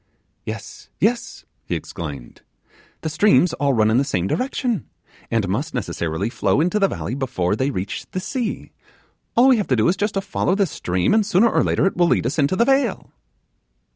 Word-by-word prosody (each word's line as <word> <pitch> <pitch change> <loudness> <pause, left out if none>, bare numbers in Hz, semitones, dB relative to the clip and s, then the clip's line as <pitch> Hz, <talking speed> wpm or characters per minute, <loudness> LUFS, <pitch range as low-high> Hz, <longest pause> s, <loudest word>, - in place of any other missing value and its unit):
'Yes, - - -7
yes,' 235 +2 -1 0.2
he - - -3
exclaimed; 75 -7 -7 0.6
'the 160 - -2
streams 180 +2 +3
all 140 -1 +1
run 110 -1 +3
in 115 - +4
the - - +3
same 90 -9 -1
direction, 250 - -2 0.4
and 115 -4 0
must 110 +12 -2
necessarily 85 -4 -2
flow 125 - 0
into 180 +6 +1
the 195 - +4
valley - - -4
before 120 -9 -1
they 130 +5 0
reach 100 -7 -4
the 185 - -3
sea; 235 +4 -4 0.7
all 245 +3 +7
we 255 - +5
have 210 - -1
to 130 - +2
do 110 -2 +2
is 180 - +3
just 205 +3 -2
to 195 - +1
follow 185 -1 0
this 195 -5 +1
stream, 90 0 0
and 220 0 +4
sooner 210 +3 +3
or - - +2
later - - +1
it 195 - +1
will 175 0 +3
lead - - +2
us 135 +6 -1
into 145 +5 +2
the 235 - +3
vale. 270 -5 +1
155 Hz, 200 wpm, -21 LUFS, -, 0.7 s, all